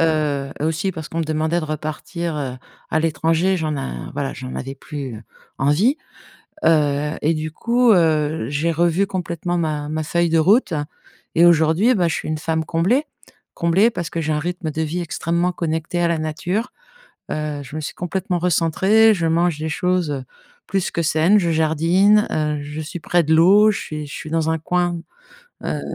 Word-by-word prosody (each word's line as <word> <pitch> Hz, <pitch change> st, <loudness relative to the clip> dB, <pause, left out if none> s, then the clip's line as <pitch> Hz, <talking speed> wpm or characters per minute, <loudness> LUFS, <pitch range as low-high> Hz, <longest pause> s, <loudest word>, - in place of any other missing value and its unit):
heu, 150 Hz, -4 st, +1 dB
et -, -, 0 dB
aussi 165 Hz, +4 st, -1 dB
parce 155 Hz, -3 st, -7 dB
qu'on 165 Hz, -, -5 dB
me -, -, 0 dB
demandait 160 Hz, +2 st, 0 dB
de -, -, -4 dB
repartir, 155 Hz, +2 st, -4 dB
heu, 135 Hz, -3 st, -3 dB, 0.4 s
à 155 Hz, -, +2 dB
l'étranger. 165 Hz, +3 st, +1 dB
J'en 155 Hz, -3 st, -2 dB
a 60 Hz, -, -5 dB
voilà, -, -, -3 dB
j'en 65 Hz, 0 st, -7 dB
avais 135 Hz, -, -5 dB
plus, 140 Hz, -3 st, -7 dB
heu, 110 Hz, -, -11 dB, 0.4 s
envie, 175 Hz, -, +3 dB, 0.7 s
heu, 150 Hz, -2 st, +2 dB
et 160 Hz, +2 st, +2 dB
du 155 Hz, 0 st, -3 dB
coup, 235 Hz, +7 st, +3 dB
heu, 160 Hz, -4 st, +2 dB
j'ai 150 Hz, +4 st, 0 dB
revu 175 Hz, +4 st, +2 dB
complètement 175 Hz, -2 st, -3 dB
ma 150 Hz, -3 st, -2 dB
ma 155 Hz, +1 st, -2 dB
feuille 170 Hz, +2 st, +1 dB
de 165 Hz, 0 st, +2 dB
route. 190 Hz, +3 st, +3 dB, 0.6 s
Et 170 Hz, +1 st, +5 dB
aujourd'hui, 170 Hz, +8 st, +4 dB
bah, 175 Hz, -4 st, +2 dB
je -, -, -1 dB
suis -, -, -4 dB
une 155 Hz, 0 st, -2 dB
femme 160 Hz, +1 st, -1 dB
comblée. 185 Hz, -, +1 dB, 0.5 s
Comblée 180 Hz, +7 st, +3 dB
parce 175 Hz, -7 st, -4 dB
que 165 Hz, -, -3 dB
j'ai 155 Hz, 0 st, -1 dB
un 150 Hz, -, 0 dB
rythme 175 Hz, 0 st, -3 dB
de 160 Hz, +2 st, -2 dB
vie 160 Hz, +3 st, -2 dB
extrêmement 170 Hz, +1 st, -1 dB
connecté 160 Hz, 0 st, -2 dB
à 175 Hz, -, +3 dB
la 170 Hz, -1 st, 0 dB
nature. 175 Hz, +9 st, -2 dB, 0.6 s
Heu, 150 Hz, -1 st, -3 dB
je 140 Hz, -, -11 dB
me 155 Hz, -, -3 dB
suis 145 Hz, -, -5 dB
complètement 180 Hz, +1 st, -2 dB
recentrée, 190 Hz, +6 st, +3 dB
je 170 Hz, -4 st, -1 dB
mange 165 Hz, -1 st, +1 dB
des 160 Hz, +1 st, -3 dB
choses 165 Hz, -5 st, 0 dB, 0.4 s
plus 195 Hz, -2 st, -1 dB
que 170 Hz, -, -1 dB
saines, 165 Hz, +5 st, +3 dB
je 175 Hz, -4 st, 0 dB
jardine, 165 Hz, +7 st, +3 dB
heu, 150 Hz, -1 st, -1 dB
je 150 Hz, +2 st, -6 dB
suis 160 Hz, +3 st, -6 dB
près 175 Hz, +2 st, +2 dB
de 160 Hz, +1 st, +2 dB
l'eau, 200 Hz, +6 st, +6 dB
je 205 Hz, -, -2 dB
suis 150 Hz, -1 st, -6 dB
je 145 Hz, -, -11 dB
suis 155 Hz, -, -7 dB
dans 160 Hz, -1 st, 0 dB
un 160 Hz, -, 0 dB
coin. 175 Hz, +1 st, -1 dB, 0.6 s
Heu, -, -, -2 dB
160 Hz, 190 wpm, -21 LUFS, 155-175 Hz, 0.7 s, l'eau